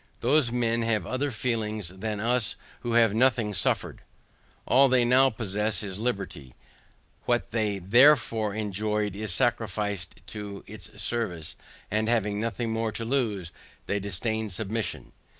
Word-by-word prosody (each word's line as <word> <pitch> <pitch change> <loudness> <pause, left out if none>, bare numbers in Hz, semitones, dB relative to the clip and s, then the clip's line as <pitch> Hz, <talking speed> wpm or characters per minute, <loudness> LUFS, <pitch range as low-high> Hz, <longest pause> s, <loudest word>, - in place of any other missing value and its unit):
Those 130 0 +3
men 115 -1 +1
have 110 -5 0
other 135 +7 -1
feelings 110 -5 -2
than 105 +3 -4
us 115 0 +1 0.2
who 120 - -3
have 115 -3 +5
nothing 115 -2 +2
suffered. - - -1 0.6
All 135 +2 +5
they 125 -1 +4
NOW 130 +2 +5
possess 105 -2 -1
is 100 -1 -5
liberty, 95 - -4 0.7
what - - 0
they 105 -3 0
before 115 0 +4
enjoyed 105 -1 -1
is 105 0 -2
sacrificed 105 -3 0
to 105 -2 -7
its - - -10
service, 90 -10 -2 0.4
and 110 +2 +1
having 105 -3 +1
nothing 115 0 -2
more 115 0 -1
to 115 +1 -5
lose, 110 -9 -1 0.3
they 100 - -1
disdain 110 +3 -2
submission. 110 +3 -3
110 Hz, 135 wpm, -27 LUFS, 100-120 Hz, 0.7 s, have